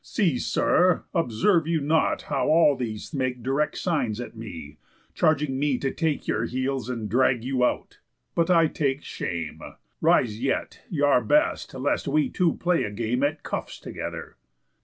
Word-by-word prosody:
See, 170 - 0
sir, 180 -2 +2
observe 165 - +2
you 165 -1 +1
not 155 +2 +1
how 140 -2 -1
all 155 -3 +5
these 115 +1 -5
make 130 -3 -2
Direct 140 +4 0
signs 130 - -1
at 120 -1 -7
me, 80 -10 -9 0.3
charging 150 -4 +1
me 145 -2 +1
to 135 +1 -2
take 160 -3 -2
Your - - 0
heels, 130 0 -2
and 115 -4 -3
drag 120 +2 +2
you 130 0 0
out? - - -1 0.3
But 170 +1 +1
I 165 -2 +5
take 145 -2 -1
shame. 85 -2 -5 0.4
Rise 110 -1 +2
yet, 135 - -2
y' 150 -5 -1
are 140 -3 +4
best, 305 - +1
lest 130 +3 -1
we 150 +1 +2
two 175 -3 +1
play 175 -1 +1
a - - -2
game 115 +4 -2
At 145 +2 0
cuffs - - -5
together." - - -7
135 Hz, 165 wpm, -25 LUFS, 125-160 Hz, 0.4 s, all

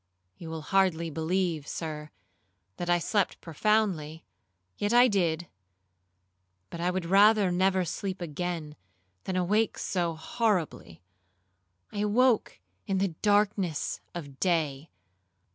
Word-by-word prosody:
You 165 - -9
will 160 -1 -5
hardly 170 -2 +1
believe, 165 -1 -1
Sir, 155 -2 -5 0.7
that 175 - -4
I 175 - +5
slept 200 +3 0
profoundly; 165 -3 0 0.5
yet 205 +2 -1
I 245 +1 +7
did; 175 -6 0 1.2
but 170 - -6
I 175 - +1
would 180 -1 -2
rather 200 +1 +5
never 185 +1 +2
sleep 190 +3 -4
again, 170 -2 -4 0.5
than 190 - -2
awake 205 +5 +1
so 170 -3 -1
horribly. 165 - -2 0.9
I 205 - -5
awoke 220 - +2 0.3
in 195 - 0
the 195 0 +1
darkness 200 -2 0
of 140 -6 -8
day. 160 -5 0
180 Hz, 115 wpm, -28 LUFS, 160-200 Hz, 1.2 s, I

